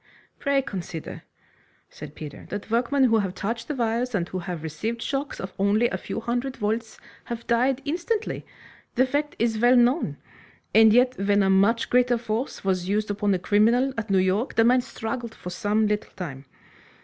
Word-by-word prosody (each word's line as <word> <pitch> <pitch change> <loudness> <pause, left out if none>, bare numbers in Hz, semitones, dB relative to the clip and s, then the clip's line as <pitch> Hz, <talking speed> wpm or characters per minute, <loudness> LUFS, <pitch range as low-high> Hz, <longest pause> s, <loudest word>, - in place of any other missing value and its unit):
"Pray 280 -1 +1
consider," 175 - -6 0.7
said - - -10
Peter, 150 -2 -9
"that 205 +1 -6
workmen 250 +4 +2
who 225 -3 +4
have 190 -3 -2
touched 230 +3 -3
the 295 - -3
wires, 235 0 -1
and 175 -3 0
who 185 - -3
have 175 -3 -5
received 215 +10 -3
shocks 275 +4 -3
of 190 -1 -6
only 205 +4 +3
a 190 - -2
few - - -5
hundred 245 +3 -2
volts, 220 +1 -2 0.3
have 235 -1 -6
died 255 +3 +1
instantly. 360 +9 -2 0.5
The 255 +1 +4
fact 290 +3 -2
is 225 -1 0
well 245 +2 +5
known. 250 +6 +3 0.6
And 220 0 +7
yet 250 +3 +4
when 200 0 +3
a 195 - +3
much 205 +5 +3
greater 245 -1 +4
force 230 +2 -3
was 185 -1 0
used 210 +1 0
upon 205 0 0
a - - +1
criminal 225 +8 +3
at 225 -2 -4
New 195 - +3
York, 190 +6 +1
the 225 - +5
man 250 +2 +4
struggled 230 0 -5
for 180 - -8
some 210 +4 +1
little 210 0 -1
time. 140 -7 -7
225 Hz, 185 wpm, -25 LUFS, 200-245 Hz, 0.7 s, And